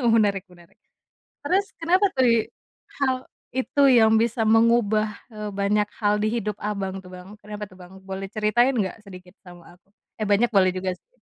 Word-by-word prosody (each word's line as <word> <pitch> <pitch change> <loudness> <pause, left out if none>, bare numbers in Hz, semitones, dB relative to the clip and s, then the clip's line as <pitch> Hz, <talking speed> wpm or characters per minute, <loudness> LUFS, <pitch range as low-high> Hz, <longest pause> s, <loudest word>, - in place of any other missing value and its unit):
Menarik 200 -3 +1
menarik. 175 -2 -20 0.7
Terus 380 +6 +2
kenapa 365 +4 +2
tadi, 235 -3 +3 0.5
hal, 260 -2 +2 0.4
itu 260 +2 -1
yang 225 -4 +5
bisa 230 0 0
mengubah, 220 -1 +3 0.2
eee, 210 -1 -6
banyak 205 +1 +1 0.2
hal 205 0 +2
di 210 - 0
hidup 210 -3 -3
Abang 195 -2 -4
tuh 185 -1 -12
Bang, 185 +4 -12
kenapa 210 0 -9
tuh 185 - -17
Bang? 180 +1 -13
Boleh 195 0 -6
ceritain 215 +6 +1
nggak 210 -1 -3
sedikit 180 +1 -13
sama 175 0 -15
aku. - - -59 0.3
Eh, 215 - -2
banyak 210 +4 +3
boleh 185 -4 +3
juga 185 0 -2
sih. - - -42
210 Hz, 170 wpm, -24 LUFS, 190-230 Hz, 0.7 s, yang